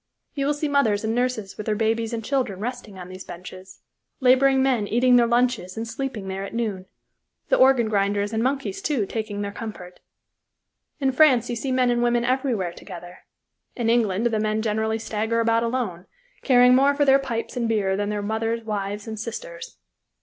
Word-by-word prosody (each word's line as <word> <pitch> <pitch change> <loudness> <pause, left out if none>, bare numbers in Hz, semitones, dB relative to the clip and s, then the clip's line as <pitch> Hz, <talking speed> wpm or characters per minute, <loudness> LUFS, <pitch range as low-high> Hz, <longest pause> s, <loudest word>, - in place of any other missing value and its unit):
You 275 -1 -1
will 295 - +1
see 300 +1 -2
mothers 250 -8 +2
and 220 0 -1
nurses 245 -5 -2
with 210 - -7
their 215 - +1
babies 225 +1 0
and 225 -2 -4
children 250 -9 -1
resting 230 -3 -6
on 180 -1 -8
these 185 +1 -9
benches, 185 +2 -11 0.4
laboring 265 +1 +4
men 245 -6 +1
eating 250 +3 +3
their 240 -1 +5
lunches 240 -6 0
and 225 +1 -3
sleeping 235 -5 -5
there 190 0 -4
at 200 - -7
noon, 205 -5 -3 0.6
the - - +4
organ 260 -3 +5
grinders 205 0 0
and 220 - 0
monkeys, 275 +10 -2
too, 290 - 0
taking 210 0 -4
their 200 0 -3
comfort. 205 -5 -8 1.0
In 270 -2 +1
France 260 -4 +4
you - - -2
see 260 +3 -3
men 255 -1 +2
and 240 0 +1
women 240 0 +2
everywhere 245 -9 0
together; 175 -1 -11 0.6
in 230 -2 0
England 225 -3 +1
the 225 -2 +1
men 215 0 0
generally 220 0 0
stagger 220 +1 -2
about 230 0 +2
alone, 230 -7 -3 0.3
caring 250 -2 +5
more 275 +2 +4
for 290 0 +2
their 270 0 +5
pipes 235 -4 -4
and 235 -2 -1
beer 200 -4 +1
than 205 +1 -2
their 210 -1 -2
mothers, 225 +2 -2
wives, 205 -1 -4
and 220 -1 -6
sisters. - - -7
230 Hz, 190 wpm, -24 LUFS, 205-255 Hz, 1.0 s, their